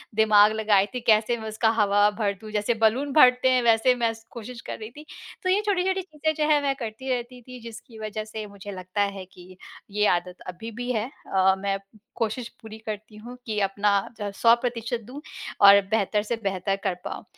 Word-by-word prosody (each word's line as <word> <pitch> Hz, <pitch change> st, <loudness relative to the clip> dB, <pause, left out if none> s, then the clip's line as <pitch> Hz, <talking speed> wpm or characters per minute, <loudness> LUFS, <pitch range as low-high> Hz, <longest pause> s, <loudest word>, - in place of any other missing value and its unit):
दिमाग 215 Hz, -1 st, +6 dB
लगाई 210 Hz, -3 st, +3 dB
थी, 250 Hz, -, -3 dB
कैसे 220 Hz, +2 st, +3 dB
मैं 220 Hz, -1 st, -6 dB
उसका 220 Hz, +1 st, +1 dB
हवा 205 Hz, 0 st, +4 dB
भर 205 Hz, -2 st, +1 dB
दूँ, 215 Hz, -1 st, -9 dB
जैसे 210 Hz, +2 st, 0 dB
बलून 260 Hz, +6 st, +2 dB
भरते 255 Hz, -3 st, +6 dB
हैं 255 Hz, -1 st, +3 dB
वैसे 230 Hz, +2 st, +4 dB
मैं 235 Hz, -2 st, +1 dB
स 225 Hz, 0 st, -16 dB
कोशिश 235 Hz, +1 st, -8 dB
कर -, -, -5 dB
रही 215 Hz, 0 st, -7 dB
थी। 300 Hz, +4 st, -13 dB, 0.4 s
तो 370 Hz, -, 0 dB
ये 400 Hz, +3 st, +3 dB
छोटी-छोटी 380 Hz, -1 st, +1 dB
चीज़ें 315 Hz, -3 st, -2 dB
जो 300 Hz, -, +1 dB
है 290 Hz, -, +3 dB
मैं 275 Hz, -1 st, +1 dB
करती 240 Hz, 0 st, -6 dB
रहती 250 Hz, 0 st, -3 dB
थी 250 Hz, +1 st, -11 dB
जिसकी 230 Hz, 0 st, -11 dB
वजह 215 Hz, 0 st, -4 dB
से 215 Hz, 0 st, -7 dB
मुझे 200 Hz, 0 st, -10 dB
लगता 185 Hz, +1 st, -4 dB
है 200 Hz, -2 st, -2 dB
कि 180 Hz, +1 st, -15 dB, 0.3 s
ये 210 Hz, +1 st, +1 dB
आदत 180 Hz, +1 st, -4 dB
अभी 180 Hz, +6 st, -7 dB
भी 245 Hz, -, -2 dB
है 220 Hz, -2 st, -1 dB, 0.3 s
अ, 190 Hz, 0 st, +4 dB
मैं 195 Hz, 0 st, -1 dB, 0.4 s
कोशिश 230 Hz, +2 st, -2 dB
पूरी 220 Hz, -1 st, -10 dB
करती 215 Hz, 0 st, -6 dB
हूँ 240 Hz, +3 st, -10 dB
कि 215 Hz, -2 st, -2 dB
अपना 205 Hz, +1 st, +1 dB, 0.2 s
जो 210 Hz, -, -6 dB
है 205 Hz, -, -3 dB
100% 235 Hz, 0 st, +1 dB
दूँ 275 Hz, +4 st, -9 dB, 0.5 s
और 200 Hz, 0 st, +9 dB
बेहतर 210 Hz, -1 st, +1 dB
से 225 Hz, +2 st, -2 dB
बेहतर 195 Hz, 0 st, -1 dB
कर 180 Hz, -, 0 dB
पाऊँ। -, -, -6 dB
220 Hz, 205 wpm, -25 LUFS, 205-245 Hz, 0.5 s, और